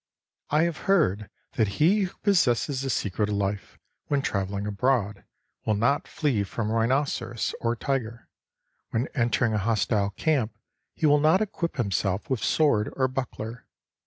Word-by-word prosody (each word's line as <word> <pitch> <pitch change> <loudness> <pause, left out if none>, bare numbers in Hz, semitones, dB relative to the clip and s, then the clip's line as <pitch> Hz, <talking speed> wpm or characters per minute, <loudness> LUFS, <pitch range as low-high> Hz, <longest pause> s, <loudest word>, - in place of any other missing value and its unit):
I 150 +2 +3
have 170 -1 -1
heard 110 - +2 0.3
that 110 - +3
he 190 +6 +4
who 185 - -9
possesses 145 - +2
the 135 - -3
secret 105 -2 -1
of 105 - -1
life, 100 0 -3 0.3
when 140 -1 0
travelling 100 0 -2
abroad, 105 -1 0 0.4
will 110 - +1
not 125 +7 +1
flee 135 -9 0
from 105 +2 -3
rhinoceros 120 0 0
or 115 0 0
tiger; 120 -2 -3 0.6
when 115 +3 -1
entering 120 -2 +1
a 105 - +1
hostile 105 -1 +1
camp, 125 +1 0 0.4
he - - -1
will 145 0 +5
not 155 +5 +4
equip 185 -6 -2
himself 100 - -1
with 130 - 0
sword 130 -10 +2
or 130 -1 +2
buckler. 125 -3 -5
120 Hz, 150 wpm, -26 LUFS, 105-145 Hz, 0.6 s, will